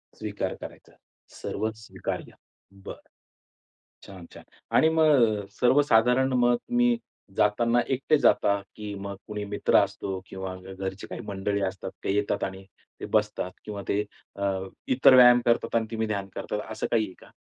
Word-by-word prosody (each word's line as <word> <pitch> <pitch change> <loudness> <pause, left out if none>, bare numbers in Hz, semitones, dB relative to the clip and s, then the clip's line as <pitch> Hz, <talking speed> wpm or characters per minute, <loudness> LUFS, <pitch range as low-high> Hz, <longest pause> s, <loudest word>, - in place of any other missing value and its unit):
स्वीकार - - -4
करायचा. - - -11 0.5
सर्वच 110 +2 -3
स्वीकार्य. - - -5 0.5
बरं. - - -10 1.0
छान, 95 -3 -11
छान. - - -12 0.3
आणि 160 - +6
मग 135 -10 +3
सर्वसाधारण 130 0 +4
मग 120 -1 +4
तुम्ही 245 - +1 0.4
जाताना 115 +3 +3 0.2
एकटे 145 +4 +2
जाता 100 0 +3 0.2
की 105 -1 -6
मग 100 0 -6
कुणी 105 -1 -4
मित्र 105 0 0
असतो 95 -1 0
किंवा 95 -1 -6 0.2
घरची 95 0 -6
काही - - -7
मंडळी 100 0 -2
असतात 95 -1 -4
ते - - 0
येतात 105 0 0
आणि 95 0 -5 0.4
ते - - -5
बसतात 105 -3 0
किंवा 105 -2 -5
ते 105 +1 +1 0.4
अ, 100 0 +1 0.4
इतर 130 0 +6
व्यायाम 125 -1 +8
करतात 115 0 +1
आणि 115 - +2
तुम्ही 110 -1 -1
ध्यान 100 -2 -3
करतात 105 - -3
असं 110 - -3
काही 115 -2 +3
आहे 95 - -11
का? - - -17
105 Hz, 150 wpm, -26 LUFS, 100-125 Hz, 1.0 s, व्यायाम